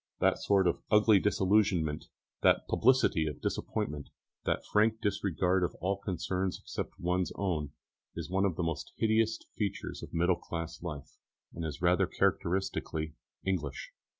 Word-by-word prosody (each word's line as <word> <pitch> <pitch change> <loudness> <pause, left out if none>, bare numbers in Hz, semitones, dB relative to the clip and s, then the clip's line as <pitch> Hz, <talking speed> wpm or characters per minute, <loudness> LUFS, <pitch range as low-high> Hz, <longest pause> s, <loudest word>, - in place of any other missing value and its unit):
That - - +3
sort 100 -2 +3
of 85 - +1
ugly 105 -1 +6
disillusionment, 95 -6 +2 0.4
that - - +4
publicity 120 -10 +3
of 75 - -4
disappointment, 75 -1 -3 0.4
that - - 0
frank 110 +1 +2
disregard 95 -2 +1
of 90 - -1
all 95 +4 -1
concerns 95 -1 -2
except - - -6
one's 90 0 0
own, 80 -7 -2 0.4
is - - -4
one 95 +2 +1
of 95 -4 0
the 90 - -1
most 85 -2 -3
hideous 110 0 +2 0.2
features 100 -2 -3
of - - -9
middle 90 +2 +2
class 85 -1 -6
life, 75 -5 -7 0.3
and 85 - -5
it - - -1
is 80 +3 -7
rather 90 0 +4
characteristically 85 -3 -1 0.3
English. 90 -7 -2
90 Hz, 150 wpm, -31 LUFS, 80-100 Hz, 0.4 s, ugly